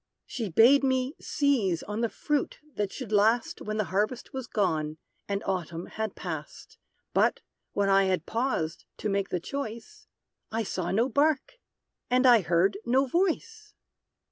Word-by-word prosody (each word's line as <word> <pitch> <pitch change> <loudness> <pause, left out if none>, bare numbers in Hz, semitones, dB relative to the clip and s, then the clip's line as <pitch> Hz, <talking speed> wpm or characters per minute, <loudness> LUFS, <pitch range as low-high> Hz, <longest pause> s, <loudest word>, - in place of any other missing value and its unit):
She 225 -5 -4
bade 240 - +6
me 260 0 +1
seize 235 - +1
on 210 +2 -4
the 230 - +1
fruit 295 +4 -1 0.2
that 205 -4 -2
should 255 -6 -7
last 220 +3 +2
When 215 0 -3
the 215 - +2
harvest 215 +5 -1
was 265 -2 -5
gone, 155 -8 0 0.3
and 200 0 -2
Autumn 175 -3 -3
had 220 -2 -4
past. 160 -5 -7 0.3
But, - - +2 0.3
when 200 -1 +1
I 195 0 +5
had 185 -4 0
paused 225 -10 -2
to 215 - -2
make 195 -1 0
the 180 - -1
choice, 235 - -6 0.4
I 225 +1 -1
saw 185 -3 -3
no 230 +6 +2
bark! 290 - +1 0.5
and 255 +1 +3
I 240 -4 +7
heard 180 +4 +2
no 260 +3 +3
voice! 390 - -1
220 Hz, 155 wpm, -28 LUFS, 195-260 Hz, 0.5 s, I